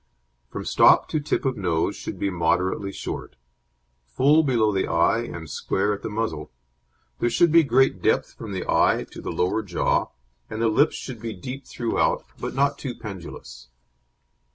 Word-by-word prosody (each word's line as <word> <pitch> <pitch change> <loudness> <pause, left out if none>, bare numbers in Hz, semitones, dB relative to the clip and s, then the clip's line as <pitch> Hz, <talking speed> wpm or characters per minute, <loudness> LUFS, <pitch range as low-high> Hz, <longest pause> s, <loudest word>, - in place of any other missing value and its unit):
From - - -6
stop - - +5
to 155 - 0
tip 150 0 -2
of 130 -2 0
nose 85 -4 0
should - - -6
be 100 - -1
moderately 90 +3 0
short; - - -6 0.7
full 140 - +4
below 120 -7 +2
the 95 - 0
eye 85 +7 +2
and 85 -9 -6
square 95 +7 -1
at 100 - -6
the - - -4
muzzle; 80 -10 -3 0.7
there 120 - +2
should 150 +8 +3
be 165 +1 +7
great 135 -3 +2
depth - - +1
from 110 -3 -8
the 95 -2 -4
eye - - +3
to - - -9
the - - -5
lower 90 +5 0
jaw, 95 -5 0 0.4
and 110 - -5
the 115 0 +2
lips 145 +8 +3
should 125 -5 -7
be 115 -1 -4
deep 125 +8 -8
throughout, 115 -2 0
but - - -5
not 140 +1 +1
too 130 -4 -5
pendulous. 85 - -9
110 Hz, 175 wpm, -24 LUFS, 90-130 Hz, 0.7 s, be